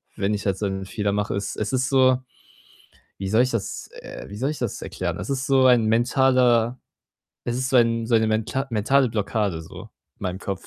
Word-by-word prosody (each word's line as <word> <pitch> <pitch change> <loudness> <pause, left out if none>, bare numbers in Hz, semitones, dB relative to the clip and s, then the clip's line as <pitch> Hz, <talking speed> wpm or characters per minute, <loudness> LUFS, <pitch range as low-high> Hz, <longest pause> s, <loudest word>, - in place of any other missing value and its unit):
wenn 100 +1 0
ich 100 - -3
halt 95 -2 0
so 105 - -1
'n 95 0 -4
Fehler 100 +1 -2
mache, 105 0 -1
ist 100 - -4
es 105 +3 -2
ist 130 +1 +1
so, 130 -2 +4 1.0
wie 95 0 -4
soll 110 +4 +4
ich 125 - 0
das, 115 -4 -4
äh - - -9
wie 100 - -8
soll 135 +6 -1
ich 155 - -7
das 120 -5 -3
erklären? - - -4
Es 90 - -6
ist 130 -1 -2
so 135 -1 +4
ein 120 -3 +5
mentaler 120 0 +3 0.7
es 120 - -2
ist 130 +1 -2
so 130 - +4
ein 115 -1 +3
so 120 - +1
eine 110 0 +4
menta 110 +5 -1
mentale 125 +5 +2
Blockade 105 -5 -1
so, 80 - -11 0.4
in - - -16
meinem 90 0 -2
Kopf. 100 -1 -5
115 Hz, 220 wpm, -23 LUFS, 100-130 Hz, 1.0 s, ein